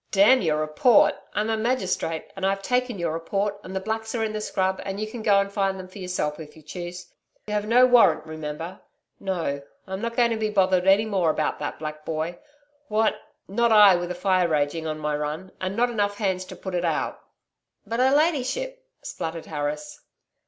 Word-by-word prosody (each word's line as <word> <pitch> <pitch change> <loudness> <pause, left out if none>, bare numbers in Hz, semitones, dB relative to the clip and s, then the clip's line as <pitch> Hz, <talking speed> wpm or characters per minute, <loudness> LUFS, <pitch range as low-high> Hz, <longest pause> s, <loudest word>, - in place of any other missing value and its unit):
'Damn 210 +6 +5
your 155 -4 +1
report. 155 +10 +4 0.2
I'm 215 +2 0
a - - +2
magistrate, 195 -8 -1
and 195 - -7
I've 195 0 0
taken 250 0 0
your 170 -3 -1
report, 200 +5 -2
and 185 +1 -8
the - - +1
blacks 220 +3 -3
are 225 - 0
in 215 -1 -2
the 215 - -3
scrub 190 -2 -1
and 195 0 -4
you 215 - -1
can 220 +2 -7
go 205 -2 +4
and 200 0 -2
find 195 -1 0
them 185 - -8
for 185 +2 -12
yourself 180 -5 -2
if 155 -2 -10
you 160 - -15
choose. 175 +3 -8 0.3
You 210 - -5
have 210 0 -1
no 245 +3 +6
warrant, 240 -11 +5
remember. 155 +3 -6 0.4
No, 170 -7 -2 0.2
I'm 190 +1 -5
not 230 0 -3
going 235 -1 +3
to 225 - 0
be 215 -1 -1
bothered 185 -2 +2
any 195 +3 +5
more 190 -6 +1
about 155 0 0
that 145 - -4
black 155 0 -6
boy. 160 +2 -3 0.5
What.... 215 +1 +1 0.3
Not 235 +4 +1
I 205 -3 +8
with 175 0 -2
a 180 - -3
fire 185 -1 +2
raging 155 +1 0
on 155 0 -3
my 150 -1 -1
run, 150 +5 -4
and 185 +1 -2
not 245 +1 +2
enough 205 -2 0
hands 190 -3 -1
to - - -9
put 190 - -7
it 175 -1 0
out.' 165 -3 -1 0.6
'But 230 +1 -3
her 260 +1 +5
ladyship....' 335 - 0 0.2
spluttered 165 0 -5
Harris. 150 0 -4
190 Hz, 210 wpm, -25 LUFS, 165-215 Hz, 0.6 s, I